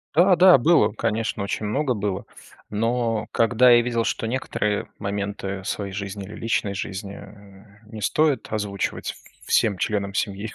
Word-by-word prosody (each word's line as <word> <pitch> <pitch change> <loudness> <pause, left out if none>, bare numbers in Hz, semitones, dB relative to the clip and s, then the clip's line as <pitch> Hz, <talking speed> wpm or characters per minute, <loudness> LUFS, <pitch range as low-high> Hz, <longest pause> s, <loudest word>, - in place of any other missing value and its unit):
Да, 180 +3 +6
да, 180 -1 +8
было, 160 +3 +4
конечно, 110 -1 -2
очень 100 +2 -3
много 130 +5 0
было. 100 -3 -3 0.4
Но 115 +1 -1
когда 120 +2 +4
я 120 0 +7
видел, 120 -1 -1
что 115 - -2
некоторые 110 -3 -2
моменты 100 -1 -4
своей 100 -1 -4
жизни 100 0 -5
или 105 - -10
личной 110 -3 -1
жизни 100 +1 -6 0.7
не 110 0 -9
стоит 150 +6 +1
озвучивать 105 -2 -3 0.3
всем 105 -4 +2
членам 100 0 -1
семьи, 100 +1 -3
105 Hz, 140 wpm, -23 LUFS, 100-120 Hz, 0.7 s, да